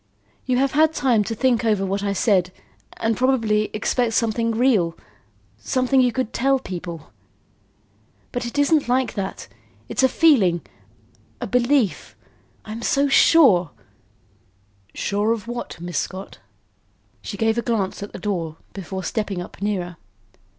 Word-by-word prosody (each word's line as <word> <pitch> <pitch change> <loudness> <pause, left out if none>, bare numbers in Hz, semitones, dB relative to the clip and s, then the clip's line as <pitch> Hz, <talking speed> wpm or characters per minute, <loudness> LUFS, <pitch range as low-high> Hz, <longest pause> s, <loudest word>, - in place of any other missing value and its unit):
"You 250 -1 +2
have 270 +1 +2
had 315 +1 +3
time 245 -8 +2
to 225 - -3
think 245 0 +1
over 210 -4 +1
what 195 +1 -2
I 200 0 -1
said 190 -2 +2 0.5
and 225 0 0
probably 225 -5 +2
expect 225 +2 0
something 230 0 +1
real, 220 -8 +2 0.6
something 255 - +2
you 250 -1 +3
could 255 -1 -3
tell 270 +2 +2
people. 170 - -7 1.2
But 245 -1 -3
it 235 - -7
isn't 285 0 +3
like 255 +1 +1
that. 195 -2 -5 0.4
It's - - -1
a 260 - +5
feeling 215 - +4 0.8
a - - -3
belief. 250 -3 +1 0.5
I'm 220 +2 -7
so 280 +3 +1
sure 255 - +5 0.7
" 100 -1 -38
"Sure 205 +3 0
of 230 -1 -6
what, 240 -6 -6
Miss 175 -3 -3
Scott?" 190 +1 -6 0.8
She 200 - -6
gave 225 +2 +1
a - - 0
glance 215 -6 -2
at 205 - -6
the - - -8
door 170 -7 -3 0.2
before 190 0 -6
stepping 205 0 -2
up 175 - -9
nearer. 180 -4 -2
220 Hz, 145 wpm, -22 LUFS, 190-255 Hz, 1.2 s, a